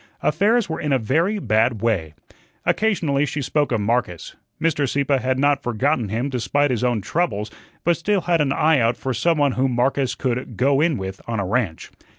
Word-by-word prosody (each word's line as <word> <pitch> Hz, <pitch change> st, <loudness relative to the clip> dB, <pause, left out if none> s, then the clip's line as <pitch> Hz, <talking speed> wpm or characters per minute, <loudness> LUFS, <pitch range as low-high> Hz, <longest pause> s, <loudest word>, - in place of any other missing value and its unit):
Affairs 205 Hz, +9 st, +2 dB
were 160 Hz, -, -4 dB
in 150 Hz, -, -2 dB
a 135 Hz, -, +4 dB
very 165 Hz, -, 0 dB
bad 110 Hz, -, +1 dB
way. 85 Hz, -10 st, -1 dB, 0.5 s
Occasionally 160 Hz, -10 st, +1 dB
she 150 Hz, -, -4 dB
spoke 145 Hz, +1 st, 0 dB
of 115 Hz, -3 st, 0 dB
Marcus. 105 Hz, -6 st, -2 dB, 0.2 s
Mr. 150 Hz, -4 st, 0 dB
Sieppe 140 Hz, 0 st, +1 dB
had 130 Hz, +1 st, -1 dB
not 140 Hz, +1 st, +2 dB
forgotten 120 Hz, -1 st, 0 dB
him 115 Hz, +6 st, -1 dB
despite 140 Hz, +2 st, 0 dB
his 125 Hz, -1 st, -1 dB
own 120 Hz, -4 st, +1 dB
troubles, 105 Hz, -, -2 dB, 0.3 s
but 170 Hz, 0 st, +3 dB
still 200 Hz, +3 st, 0 dB
had 170 Hz, -2 st, +1 dB
an 140 Hz, -2 st, +1 dB
eye 155 Hz, +1 st, +3 dB
out 115 Hz, 0 st, +1 dB
for 130 Hz, -, -3 dB
some 160 Hz, +8 st, +1 dB
one 145 Hz, -2 st, +3 dB
whom 130 Hz, 0 st, 0 dB
Marcus 130 Hz, +2 st, 0 dB
could 125 Hz, -3 st, -3 dB
"go 135 Hz, +2 st, +3 dB
in 160 Hz, -3 st, +2 dB
with" 95 Hz, -1 st, -6 dB
on 115 Hz, -2 st, -2 dB
a 100 Hz, -, -1 dB
ranch. 100 Hz, -5 st, -2 dB
135 Hz, 195 wpm, -21 LUFS, 115-150 Hz, 0.5 s, a